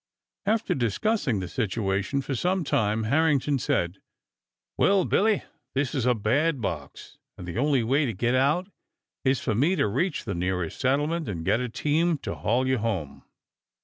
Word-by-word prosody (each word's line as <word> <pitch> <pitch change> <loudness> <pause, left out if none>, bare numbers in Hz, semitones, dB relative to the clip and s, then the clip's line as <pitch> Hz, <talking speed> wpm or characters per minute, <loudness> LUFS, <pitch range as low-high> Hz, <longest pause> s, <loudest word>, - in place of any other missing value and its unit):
After 225 +1 +1
discussing 125 - 0
the 90 - -4
situation 100 +4 -1
for 135 - -3
some 180 +7 0
time, 110 -5 +1
Harrington 140 +2 +2
said: 90 -5 -1 0.8
"Well, 195 -2 +3
Billy, 215 0 +2 0.3
this 135 -1 0
is 130 -3 0
a 125 - +4
bad 135 +8 +1
box, 80 - -6 0.2
and 90 - -8
the 90 +6 -3
only 140 -3 +2
way 135 +5 +2
to 115 - -2
get 120 +6 0
out 150 +9 +2 0.5
is 130 -1 +2
for - - 0
me 145 - +2
to 140 - +2
reach 145 - -1
the 100 - -2
nearest 90 -1 -2
settlement 150 +3 0
and 85 -5 -4
get 115 - +2
a 125 -1 -2
team 155 +7 +1
to - - -3
haul 125 +4 0
you 130 -2 +1
home." 95 -10 -3
130 Hz, 170 wpm, -26 LUFS, 105-150 Hz, 0.8 s, a